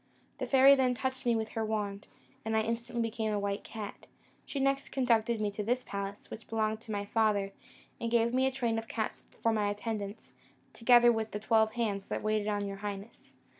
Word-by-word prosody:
The - - -2
fairy 270 0 +7
then 260 -2 +3
touched 260 0 -3
me 235 - +4
with 220 -1 -1
her 225 - -2
wand, 210 -2 -3 0.4
and 220 0 0
I - - +4
instantly 235 +1 -2
became 225 -1 -2
a 205 - 0
white 200 0 -2
cat. 215 -3 -8 0.4
She 280 - -3
next 275 0 +1
conducted 235 -3 +2
me 210 -1 0
to 205 - -4
this 245 +4 0
palace, 200 0 -6
which 215 - -8
belonged 220 -1 -1
to 225 - -9
my 205 -1 -2
father, 205 -2 +1 0.5
and 230 - -2
gave 235 0 +2
me 260 +1 +3
a - - 0
train 235 -4 0
of 225 - -9
cats 220 -1 -4
for 230 - +2
my 210 -2 +1
attendants, 205 0 -5 0.4
together 240 0 +6
with 225 -1 -1
the 210 - -4
twelve 220 0 +3
hands 210 -5 -1
that - - -3
waited 215 -1 +1
on 205 -1 0
your 195 0 -5
highness. 205 +2 -7
220 Hz, 205 wpm, -31 LUFS, 210-235 Hz, 0.5 s, fairy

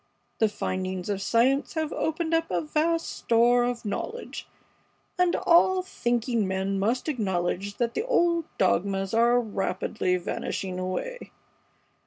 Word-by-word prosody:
The 220 - +4
findings 185 -2 -3
of 200 -1 -1
science 255 +9 +2
have 315 -1 -1
opened 320 +1 -1
up 330 0 +1
a - - 0
vast 325 +2 0
store 240 +1 +3
of 240 -1 -2
knowledge, 455 - -5 0.7
and 360 -1 +3
all 365 +2 +4
thinking 240 - -1
men 190 +1 -1
must 230 +9 0
acknowledge 200 - -1
that 235 -1 0
the - - -1
old 340 -8 +2
dogmas 195 +1 +1
are 235 +2 +4
rapidly 195 -3 -1
vanishing 180 +1 -4
away. 340 - -4
235 Hz, 130 wpm, -26 LUFS, 195-320 Hz, 0.7 s, The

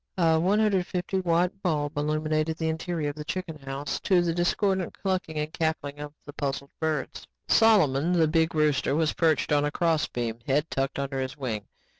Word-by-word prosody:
A 165 -2 +4
one 190 +5 +2
hundred 200 -4 +2
fifty 185 +1 -2
watt 180 +2 +1
bulb 150 -5 -1
illuminated 155 +1 0
the 160 -1 -1
interior 160 -1 -2
of 145 - -6
the 150 - -6
chicken 170 -1 -5
house 135 +1 -4
to 180 -3 +3
the 170 -1 0
discordant 185 +1 0
clucking 185 -5 -2
and 150 +1 -3
cackling 145 -3 -2
of 145 0 -6
the 145 - -9
puzzled 140 0 -3
birds. 155 -3 -2 0.2
Solomon, 180 -8 +4
the 165 -3 +4
big 160 +1 +1
rooster, 150 -2 +2
was 160 -1 +1
perched 160 -3 +1
on 145 -1 +3
a 145 - +1
crossbeam, 145 -8 -1
head 145 +3 +2
tucked 135 0 -1
under 140 -1 -2
his 130 +2 -4
wing. 110 -7 -4
155 Hz, 185 wpm, -27 LUFS, 145-175 Hz, 0.2 s, A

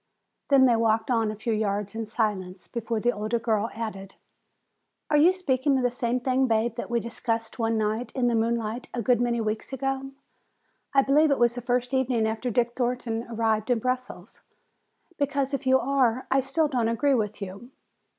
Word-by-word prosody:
Then 275 -2 +6
they 240 -2 +4
walked 225 +1 +1
on 225 -3 +2
a 215 - -4
few 220 +2 -2
yards 205 -1 -1
in 225 -1 -4
silence 205 -5 -2
before 230 -1 -3
the 240 +3 +2
older 215 +1 -2
girl 225 -1 0
added: 195 -4 -6 1.0
"Are 300 - +5
you 320 +5 +6
speaking 280 -7 +1
of 255 - 0
the 245 - +2
same 245 0 -1
thing, 260 +1 +1
Bab, 225 0 +1
that 235 - -6
we 240 0 +1
discussed 230 0 -3
one 225 0 +1
night 220 +3 -1
in 255 -2 0
the 240 - +2
moonlight 230 +1 -1
a 235 - -2
good 245 +1 +3
many 240 -1 +1
weeks 215 +2 -3
ago? 270 0 -2 0.8
I 275 -1 +4
believe 300 +3 +4
it 280 - +2
was 240 -1 +3
the 245 - -5
first 245 +1 -1
evening 250 -4 +1
after 220 +3 -2
Dick 240 +1 +1
Thornton 245 -2 -2
arrived 220 -1 0
in 245 - +3
Brussels? 255 +2 -4 0.8
Because 280 -1 0
if 275 -1 -3
you 260 0 +6
are, 255 -2 +1
I 270 - +4
still 270 +4 +1
don't 245 -5 0
agree 275 +5 +2
with 215 -4 -1
you. 200 +4 -8
235 Hz, 190 wpm, -26 LUFS, 220-260 Hz, 1.0 s, Then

